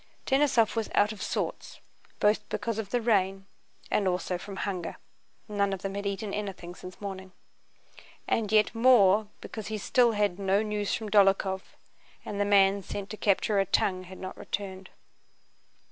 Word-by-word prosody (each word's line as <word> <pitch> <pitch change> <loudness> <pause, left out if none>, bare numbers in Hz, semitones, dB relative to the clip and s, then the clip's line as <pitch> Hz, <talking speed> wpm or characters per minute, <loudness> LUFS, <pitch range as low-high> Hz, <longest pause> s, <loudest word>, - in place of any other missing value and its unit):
Denísov 265 -5 +3
was 225 -2 -1
out 205 +1 +4
of 210 -3 -8
sorts - - -3 0.4
both 210 0 +2
because 230 -2 -2
of 210 -3 -4
the 245 +2 0
rain 195 -4 +1 0.5
and 200 - +2
also 180 0 -1
from 200 +2 -8
hunger 190 -3 -4 0.5
(none 200 -2 0
of 190 - -6
them 195 0 -3
had 200 0 -3
eaten 200 +1 -3
anything 195 -4 -5
since 180 0 -11
morning), 190 -2 -7 1.0
and 215 -2 0
yet 215 -1 +4
more 220 -4 +5
because 220 -2 -7
he 215 0 -3
still 235 +3 +3
had 205 -3 0
no 195 +2 +2
news 210 -1 -2
from 215 -2 -3
Dólokhov 195 -2 +4 0.6
and 205 -1 -3
the - - +2
man 200 -1 +4
sent 200 +1 -6
to - - -4
capture 205 +1 +2
a 195 - +3
"tongue" 185 -1 +1
had 185 +1 -11
not 185 0 -7
returned. 190 -1 -5
200 Hz, 165 wpm, -28 LUFS, 190-215 Hz, 1.0 s, more